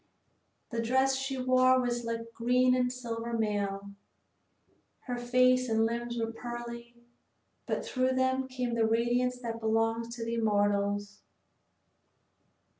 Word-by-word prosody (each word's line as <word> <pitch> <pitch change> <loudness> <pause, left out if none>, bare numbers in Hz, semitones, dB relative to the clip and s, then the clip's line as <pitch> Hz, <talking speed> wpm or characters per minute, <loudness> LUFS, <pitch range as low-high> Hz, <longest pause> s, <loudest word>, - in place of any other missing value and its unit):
The 230 -1 -1
dress 265 +3 +2
she 270 0 -3
wore 255 0 +4
was 240 -1 -1
like 230 0 -4
green 250 +2 +3
and 250 -1 +1
silver 235 -2 -5
mail. 200 -3 -1 1.1
Her 245 -2 -4
face 255 +1 +3
and 225 0 +3
limbs 235 +1 -3
were 225 -1 -1
pearly, 240 0 -7 0.7
but - - -2
through 255 0 0
them 260 0 +1
came 250 -2 -3
the 230 -1 +2
radiance 240 +2 +1
that 230 -2 -4
belongs 225 +1 0
to 230 -2 -5
the 230 - -3
immortals. 205 -2 0
235 Hz, 125 wpm, -30 LUFS, 225-255 Hz, 1.1 s, wore